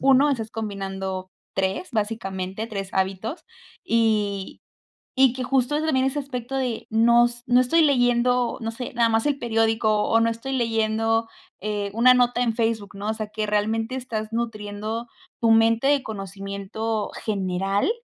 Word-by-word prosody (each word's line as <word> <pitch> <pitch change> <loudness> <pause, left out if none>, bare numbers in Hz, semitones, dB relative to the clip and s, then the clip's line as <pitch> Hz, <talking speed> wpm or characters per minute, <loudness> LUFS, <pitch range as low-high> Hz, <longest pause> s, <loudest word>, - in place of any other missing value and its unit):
1, 270 +2 +5
estás 225 -5 -2
combinando 195 -3 -4 0.2
3 190 - -1
básicamente, 210 -2 -3
3 195 -3 -5
hábitos 190 - -2 0.4
y 215 - 0 0.6
y 265 -2 +6
que 255 0 -4
justo 260 +2 +1
ese 305 +1 0
también 265 -4 +2
ese 290 +2 -1
aspecto 265 -2 -6
de 250 -4 -2
no 235 +2 +5
s 240 0 -7
no 245 +1 +5
estoy 290 +7 +3
leyendo, 245 -3 +2
no 225 -1 -3
sé, 240 +2 -6
nada 235 -1 +3
más 225 +3 +1
el 290 - +2
periódico 225 -2 +1
o 225 - +4
no 230 0 +3
estoy 230 +4 -5
leyendo, 225 -1 +1 0.3
eh, 205 0 -2
una 250 +3 +6
nota 245 0 +2
en 230 -3 +1
Facebook, 225 -3 -1
¿no? 200 +1 -5
O 220 - 0
sea 215 -1 -4
que 215 +1 -4
realmente 220 +4 0
estás 225 -4 -4
nutriendo 220 0 -4 0.3
tu 230 - +3
mente 225 +3 +4
de 285 -2 +3
conocimiento 200 +2 -4
general, 195 - 0
225 Hz, 160 wpm, -24 LUFS, 210-245 Hz, 0.6 s, y